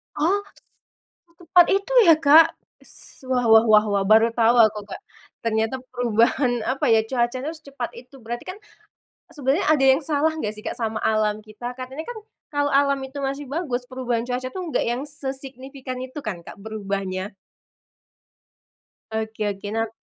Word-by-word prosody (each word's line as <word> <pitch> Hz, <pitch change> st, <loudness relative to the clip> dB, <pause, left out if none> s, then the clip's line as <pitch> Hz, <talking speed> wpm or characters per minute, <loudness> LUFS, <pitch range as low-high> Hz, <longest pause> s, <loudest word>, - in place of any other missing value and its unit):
Oh 345 Hz, +7 st, +2 dB
s -, -, -22 dB, 0.8 s
secepat 350 Hz, 0 st, +4 dB
itu 395 Hz, +5 st, 0 dB, 0.2 s
ya 320 Hz, -, +8 dB
Kak 315 Hz, +1 st, +6 dB, 0.2 s
s -, -, -9 dB
wah 250 Hz, -2 st, +1 dB
wah 220 Hz, +1 st, +8 dB
wah 215 Hz, 0 st, +6 dB
wah 200 Hz, -1 st, +1 dB
baru 225 Hz, +1 st, +6 dB
tahu 235 Hz, +1 st, +3 dB
aku 215 Hz, -2 st, +4 dB
Kak, -, -, -7 dB, 0.4 s
ternyata 225 Hz, +2 st, 0 dB, 0.2 s
perubahan 245 Hz, +2 st, +2 dB
apa 260 Hz, +1 st, -1 dB
ya 225 Hz, -1 st, +5 dB
cuacanya 255 Hz, +5 st, -1 dB
tuh 325 Hz, -, -11 dB
secepat 275 Hz, -5 st, -6 dB
itu 255 Hz, +2 st, -18 dB
berarti 240 Hz, +1 st, -5 dB
kan, 370 Hz, -, -5 dB, 0.8 s
sebenernya 280 Hz, +4 st, 0 dB
ada 280 Hz, -3 st, +3 dB
yang 265 Hz, +2 st, +5 dB
salah 305 Hz, +1 st, +1 dB
enggak 215 Hz, -8 st, -3 dB
sih 215 Hz, -, -11 dB
Kak -, -, -4 dB
sama 220 Hz, -1 st, -2 dB
alam 215 Hz, -1 st, +1 dB
kita? 240 Hz, +3 st, -8 dB
Katanya 260 Hz, +4 st, -7 dB
kan 485 Hz, -2 st, -6 dB, 0.3 s
kalau 285 Hz, 0 st, 0 dB
alam 280 Hz, 0 st, +3 dB
itu 265 Hz, +2 st, -7 dB
masih 275 Hz, +1 st, -3 dB
bagus 275 Hz, -7 st, -2 dB
perubahan 245 Hz, -3 st, -2 dB
cuaca 255 Hz, +1 st, -2 dB
itu 375 Hz, -, -7 dB
enggak 325 Hz, -, -1 dB
yang 240 Hz, +3 st, -1 dB
sesignifikan 270 Hz, -2 st, -5 dB
itu 260 Hz, +3 st, -7 dB
kan 200 Hz, -5 st, -4 dB
Kak -, -, -10 dB
berubahnya? 195 Hz, -2 st, -4 dB, 1.8 s
Oke 220 Hz, 0 st, -4 dB
oke 195 Hz, +1 st, -8 dB
nah, 225 Hz, 0 st, 0 dB
255 Hz, 165 wpm, -23 LUFS, 220-285 Hz, 1.8 s, ya